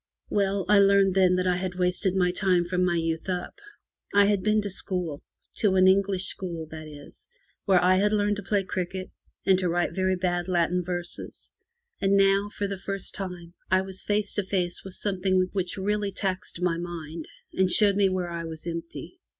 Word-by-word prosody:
Well, 200 Hz, -1 st, +1 dB
I 210 Hz, -1 st, +6 dB
learned 195 Hz, -1 st, +5 dB
then 185 Hz, -1 st, +4 dB
that 185 Hz, 0 st, 0 dB
I 180 Hz, -1 st, +2 dB
had 180 Hz, -1 st, -4 dB
wasted 180 Hz, +1 st, +1 dB
my 180 Hz, -2 st, +2 dB
time 180 Hz, -2 st, +2 dB
from 180 Hz, +1 st, 0 dB
my 175 Hz, -1 st, +2 dB
youth 165 Hz, +1 st, -2 dB
up. 180 Hz, -, -4 dB, 0.6 s
I 205 Hz, 0 st, +7 dB
had 200 Hz, -1 st, +2 dB
been 215 Hz, +1 st, +2 dB
to 205 Hz, -, -2 dB
school 180 Hz, -6 st, -2 dB, 0.2 s
— -, -, -43 dB
to 200 Hz, -3 st, +3 dB
an 185 Hz, 0 st, +5 dB
English 190 Hz, 0 st, +2 dB
school, 170 Hz, -5 st, -5 dB
that 155 Hz, -1 st, -8 dB
is 145 Hz, -1 st, -13 dB, 0.2 s
— -, -, -41 dB
where 190 Hz, -3 st, +5 dB
I 185 Hz, +1 st, +5 dB
had 205 Hz, +2 st, +2 dB
learned 205 Hz, -1 st, +1 dB
to -, -, -4 dB
play 200 Hz, 0 st, 0 dB
cricket 185 Hz, 0 st, -4 dB, 0.3 s
and 190 Hz, -1 st, +4 dB
to 180 Hz, -2 st, 0 dB
write 175 Hz, +1 st, 0 dB
very 190 Hz, 0 st, +1 dB
bad 175 Hz, -1 st, -1 dB
Latin 180 Hz, 0 st, +1 dB
verses; 175 Hz, 0 st, -4 dB, 0.5 s
and 200 Hz, 0 st, +3 dB
now, 195 Hz, +1 st, +3 dB
for 205 Hz, -, -4 dB
the 195 Hz, -1 st, -4 dB
first 195 Hz, 0 st, -4 dB
time, 180 Hz, -3 st, -7 dB, 0.2 s
I 185 Hz, +1 st, +4 dB
was 190 Hz, 0 st, -4 dB
face 205 Hz, 0 st, 0 dB
to 205 Hz, -, 0 dB
face 180 Hz, -2 st, -2 dB
with 190 Hz, -1 st, -7 dB
some 195 Hz, -3 st, -1 dB
thing 185 Hz, -1 st, +2 dB
which 190 Hz, -1 st, -2 dB
really 205 Hz, +1 st, -1 dB
taxed 185 Hz, -2 st, -3 dB
my 170 Hz, -2 st, +1 dB
mind, 165 Hz, -2 st, -6 dB, 0.3 s
and 190 Hz, -1 st, +2 dB
showed 205 Hz, 0 st, +5 dB
me 200 Hz, -1 st, +3 dB
where 180 Hz, -2 st, -2 dB
I 170 Hz, 0 st, -4 dB
was 160 Hz, -1 st, -7 dB
empty. 170 Hz, -, -6 dB
185 Hz, 205 wpm, -26 LUFS, 175-195 Hz, 0.6 s, I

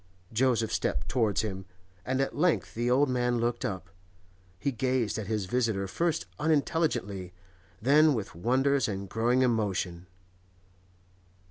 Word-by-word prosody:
Joseph 115 Hz, -2 st, +2 dB
stepped 65 Hz, +1 st, -1 dB
towards 110 Hz, -6 st, +1 dB
him, 95 Hz, -3 st, -4 dB, 0.4 s
and 130 Hz, +4 st, 0 dB
at 135 Hz, -, -2 dB
length 165 Hz, +2 st, +1 dB
the 120 Hz, +2 st, -1 dB
old 135 Hz, +4 st, +4 dB
man 125 Hz, -1 st, +1 dB
looked 120 Hz, +1 st, -1 dB
up. 95 Hz, -9 st, -4 dB, 0.7 s
He 125 Hz, +9 st, -1 dB
gazed 125 Hz, -3 st, 0 dB
at 105 Hz, -, -5 dB
his 105 Hz, -3 st, -1 dB
visitor 110 Hz, -2 st, 0 dB
first 165 Hz, -, -1 dB
unintelligently, 145 Hz, -, 0 dB, 0.5 s
then 145 Hz, +5 st, +5 dB
with 110 Hz, -4 st, -4 dB
wonder 130 Hz, +10 st, +2 dB
and 100 Hz, -2 st, -4 dB
growing 120 Hz, +5 st, +2 dB
emotion. 100 Hz, -7 st, -1 dB
120 Hz, 130 wpm, -29 LUFS, 100-130 Hz, 0.7 s, then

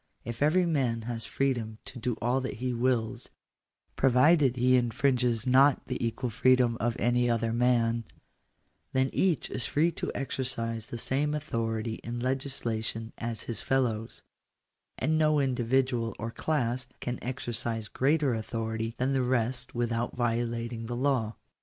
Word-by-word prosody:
If 120 Hz, +2 st, -6 dB
every 170 Hz, +5 st, +4 dB
man 130 Hz, -9 st, 0 dB
has 115 Hz, 0 st, -4 dB
freedom 120 Hz, -5 st, -1 dB
to 125 Hz, -, -8 dB
do 120 Hz, 0 st, -1 dB
all 125 Hz, +4 st, +1 dB
that 130 Hz, -, -4 dB
he 125 Hz, +2 st, -2 dB
wills, 120 Hz, -2 st, 0 dB, 0.7 s
provided 135 Hz, +1 st, +4 dB
he 130 Hz, +1 st, +4 dB
infringes 125 Hz, -1 st, +1 dB
not 135 Hz, +2 st, +5 dB
the 125 Hz, -1 st, -3 dB
equal 115 Hz, +1 st, -2 dB
freedom 125 Hz, 0 st, +4 dB
of 120 Hz, 0 st, 0 dB
any 120 Hz, 0 st, +2 dB
other 115 Hz, -1 st, +1 dB
man, 115 Hz, -1 st, +2 dB, 0.9 s
then 130 Hz, 0 st, +2 dB
each 185 Hz, -5 st, +1 dB
is 120 Hz, -, -2 dB
free 160 Hz, +4 st, +2 dB
to -, -, -4 dB
exercise 115 Hz, -4 st, -2 dB
the 120 Hz, -, -5 dB
same 145 Hz, +5 st, 0 dB
authority 115 Hz, -6 st, -2 dB
in 120 Hz, +1 st, -4 dB
legislation 120 Hz, -4 st, -2 dB
as 115 Hz, -1 st, -4 dB
his 115 Hz, -3 st, -3 dB
fellows; 115 Hz, -4 st, -1 dB, 0.7 s
and 155 Hz, +4 st, +1 dB
no 155 Hz, -1 st, +4 dB
individual 125 Hz, -2 st, +1 dB
or 115 Hz, +1 st, -4 dB
class 125 Hz, -4 st, -1 dB
can 125 Hz, 0 st, -3 dB
exercise 115 Hz, -3 st, -3 dB
greater 140 Hz, 0 st, +2 dB
authority 110 Hz, 0 st, -3 dB
than 130 Hz, +2 st, +1 dB
the 135 Hz, -, +2 dB
rest 125 Hz, 0 st, 0 dB
without 120 Hz, 0 st, -1 dB
violating 115 Hz, -1 st, -1 dB
the 120 Hz, -, -3 dB
law. 125 Hz, -4 st, 0 dB
120 Hz, 145 wpm, -29 LUFS, 115-130 Hz, 0.9 s, not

